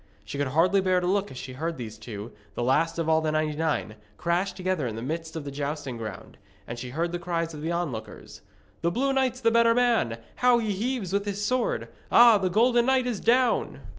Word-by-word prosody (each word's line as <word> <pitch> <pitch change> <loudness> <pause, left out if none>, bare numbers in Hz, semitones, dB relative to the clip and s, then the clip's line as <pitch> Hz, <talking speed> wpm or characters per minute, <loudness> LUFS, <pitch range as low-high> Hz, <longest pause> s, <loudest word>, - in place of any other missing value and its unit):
She 140 - -6
could 145 - +1
hardly 175 +8 +3
bear 185 -1 +2
to 180 - -3
look 200 +2 +1
as 130 - -10
she 130 0 -7
heard 165 +5 -3
these 110 -3 -7
two, 110 0 -7 0.2
the 120 - -2
last 165 +7 +2
of 165 -1 -1
all 160 0 +3
the 155 -1 0
ninety 155 -1 0
nine, 150 -9 -1 0.2
crash 175 +3 0
together 185 -7 -2
in 110 - -4
the 115 - -5
midst 160 +4 -4
of 160 - -4
the 140 - -5
jousting 140 -2 -4
ground. 110 -3 -8 0.3
And 115 +2 -6
she 125 +1 -6
heard 165 +6 -2
the 175 - -3
cries 170 -1 -2
of 150 - -8
the 160 +2 -2
onlookers. 150 -11 -5 0.4
'The 170 - +2
blue 270 +9 0
knight's 260 -1 0
the 230 -1 +3
better 230 0 +4
man! 235 - +2 0.2
How 250 -1 +5
he 220 -3 -1
heaves 215 -2 -2
with 200 0 +1
his 205 0 -2
sword! 250 +2 0 0.2
Ah, 235 -3 +8
the 185 -1 0
golden 240 +4 +3
knight 265 -1 +3
is 240 -5 -2
down!' 245 0 +2
170 Hz, 225 wpm, -26 LUFS, 145-225 Hz, 0.4 s, Ah